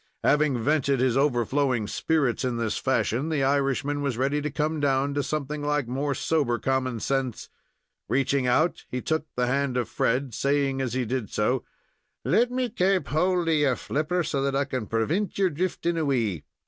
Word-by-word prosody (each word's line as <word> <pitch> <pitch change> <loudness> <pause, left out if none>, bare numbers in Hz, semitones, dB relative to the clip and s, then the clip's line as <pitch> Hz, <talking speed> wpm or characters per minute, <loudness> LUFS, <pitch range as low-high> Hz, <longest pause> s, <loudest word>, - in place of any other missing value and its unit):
Having 145 -2 +3
vented 140 -2 +2
his 125 -2 +2
overflowing 130 -2 +1
spirits 135 +3 0
in 125 -2 -1
this 115 -2 -1
fashion, 130 +8 0
the 150 -4 0
Irishman 140 +1 +1
was 140 -5 -1
ready 140 +3 0
to 150 - -2
come 155 +2 -1
down 140 0 +1
to 145 - 0
something 150 0 -3
like 145 -3 0
more 135 +3 -1
sober 140 -5 +1
common 130 0 -1
sense. 135 -1 -2 0.6
Reaching 135 -1 +1
out, 155 +8 +2
he 125 - -3
took 160 +4 -1
the 125 - +1
hand 135 0 0
of 120 -3 0
Fred, 125 +2 0
saying 140 +1 0
as 125 -3 -2
he 130 -1 0
did 120 -2 -3
so: 120 +4 0 0.6
"Let 240 +2 +3
me 250 0 -1
kaap 195 -4 +1
hold 180 +2 +1
of 165 - +3
your 145 -4 +3
flipper, 155 +8 -1
so 140 -3 -1
that 135 0 0
I 140 +1 +1
can 130 -6 -4
prevint 155 - -1
your 190 -2 +2
drifting 170 +1 -1
away. 120 - 0
140 Hz, 180 wpm, -26 LUFS, 125-150 Hz, 0.6 s, Having